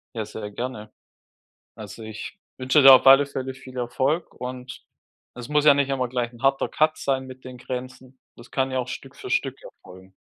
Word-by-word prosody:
Ja, 110 -2 -3
sehr 105 0 -7
gerne. 110 -1 -6 0.8
Also, 115 - -10
ich 110 - -8 0.2
wünsche 130 +3 +3
dir 135 0 +11
auf 130 - +5
alle 135 +2 +8
Fälle 130 -1 -5
viel 130 -1 -13
Erfolg 135 +7 -1
und 125 +1 -7 0.5
es 125 +2 -9
muss 150 0 +2
ja 150 - +8
nicht 140 -1 0
immer 130 -2 -1
gleich 120 -1 -3
'n 120 - -15
harter 135 0 +2
Cut 155 0 +1
sein 135 -1 -1
mit 130 0 -12
den 130 -1 -10
Grenzen. 130 +1 -8 0.2
Das 120 - -16
kann 135 -1 0
ja 130 - -2
auch 125 -1 -2
Stück 135 +1 -8
für 390 - -8
Stück - - 0
erfolgen. 95 - -15
130 Hz, 200 wpm, -24 LUFS, 120-135 Hz, 0.8 s, dir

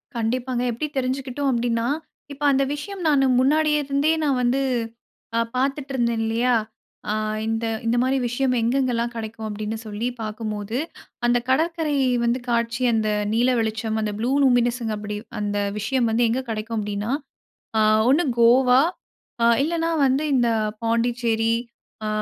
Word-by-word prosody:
கண்டிப்பாங்க. 240 +2 -1
எப்டி 240 +7 -3
தெரிஞ்சுகிட்டோம் 265 +1 -1
அப்டின்னா, 235 -1 0 0.5
இப்ப 285 +1 -9
அந்த 275 0 +3
விஷயம் 390 +6 -7
நானு 275 -2 +4
முன்னாடியே 300 +3 +3
இருந்தே 280 +3 +1
நான் 275 -4 +1
வந்து 250 +3 +2 0.8
a - - +3 0.2
பாத்துட்டு 275 +2 -1
இருந்தேன் 235 -3 0
இல்லையா, 235 +3 +1 0.6
அ - - +1 0.3
இந்த 225 +1 -1 0.2
இந்த 230 +1 +1
மாரி 265 +1 +1
விஷயம் 255 +2 0
எங்கெங்கலாம் 240 -1 0
கெடைக்கும் 220 -1 -5
அப்டின்னு 215 +1 -4
சொல்லி 215 +2 -3
பாக்கும்போது, 215 0 -4 0.5
அந்த 240 0 +4
கடற்கரை 320 +2 +1 0.3
வந்து 235 +2 +1
காட்சி 235 +1 0
அந்த 220 -1 +1 0.2
நீல 240 +3 +3
வெளிச்சம் 220 0 -1
அந்த 210 -1 -2
ப்ளூ 240 +3 0
லூமினென்ஸ் 245 -1 +3 0.2
அப்டி, 210 0 -5 0.2
அந்த 205 0 -2 0.2
விஷயம் 240 +3 +1
வந்து 230 +2 +2
எங்க 250 +3 0
கெடைக்கும் 225 +1 -3
அப்டின்னா 205 +2 -3 0.7
அ - - +4 0.3
ஒண்னு 295 +7 +4 0.2
கோவா, 250 +2 +6 0.8
இல்லனா 330 +2 0 0.2
வந்து 270 +3 +1
இந்த 240 -2 +3 0.3
பாண்டிச்சேரி, 230 -1 +1 0.5
அ - - -1
240 Hz, 140 wpm, -23 LUFS, 225-265 Hz, 0.8 s, கோவா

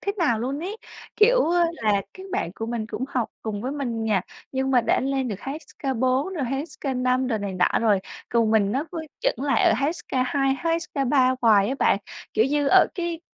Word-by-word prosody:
thế 400 - -2
nào 290 -11 +2
luôn 260 +5 -2
ấy. 395 +5 -4 0.4
Kiểu, - - +5
ơ, 350 0 +4
là 220 -10 0 0.2
các 380 0 -10
bạn 175 - -2
của 225 - -5
mình 230 -2 -3
cũng 245 - -4
học 250 -5 -1
cùng 210 -2 -3
với 260 +3 -2
mình 240 -6 -3
nhà, 210 -4 +2 0.3
nhưng 265 0 0
mà 255 -2 +5
đã 230 - +1
lên 270 -1 -1
được 210 - -3
HSK4 270 - -2
rồi 300 -6 -1
HSK5 260 -1 -1
rồi 230 -4 0
này 200 -1 -4
nọ 180 -1 +2
rồi. 210 -4 +3 0.3
Còn 230 -2 +2
mình 210 -2 +3
nó 270 +5 0
cứ 340 - -4 0.2
chững 250 - 0
lại 275 -6 +3
ở - - +5
HSK2, 270 0 0
HSK3 280 -6 +1
hoài 210 -3 +5
á 265 - -1
bạn. - - +3 0.4
Kiểu 220 - +4
như, 290 +2 +1
ở - - +6
cái 340 -3 -3
260 Hz, 200 wpm, -24 LUFS, 225-290 Hz, 0.4 s, ở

